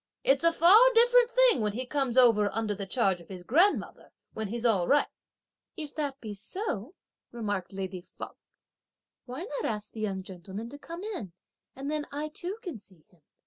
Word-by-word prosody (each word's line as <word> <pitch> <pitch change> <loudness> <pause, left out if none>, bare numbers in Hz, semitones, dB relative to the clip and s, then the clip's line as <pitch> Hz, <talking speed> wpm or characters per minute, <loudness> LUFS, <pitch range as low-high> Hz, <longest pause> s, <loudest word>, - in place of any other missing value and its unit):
"It's 270 +3 +3
a 335 - +6
far 345 +6 +7 0.2
different 485 +1 +6
thing - - +4
when 210 -1 0
he 255 +4 -3
comes 265 -2 -1
over 225 -5 +5
under 220 -1 -1
the 200 -1 -6
charge 190 -4 +1
of 170 - -16
his 185 -2 -8
grandmother, 340 - +1 0.2
when 220 -1 -3
he's 235 +3 -3
all 200 -7 +3
right." 290 +1 +4 0.7
"If 305 -3 -6
that 285 -3 -3
be 215 -2 -6
so," 235 - -4 0.4
remarked 205 -6 -3
lady 190 -1 -5
Feng, - - -9 1.0
"why 255 +4 -6
not 475 +4 -4
ask 210 -1 -3
the 225 - -9
young 195 -3 -2
gentleman 190 +4 -8
to 285 +3 -10
come 335 +4 -8
in, 355 - -5 0.4
and 275 +2 -4
then 305 -1 -2
I 295 +2 -3
too 360 +6 -5
can 340 - -6
see 185 -6 -19
him. 175 -3 -27
240 Hz, 185 wpm, -29 LUFS, 200-310 Hz, 1.0 s, far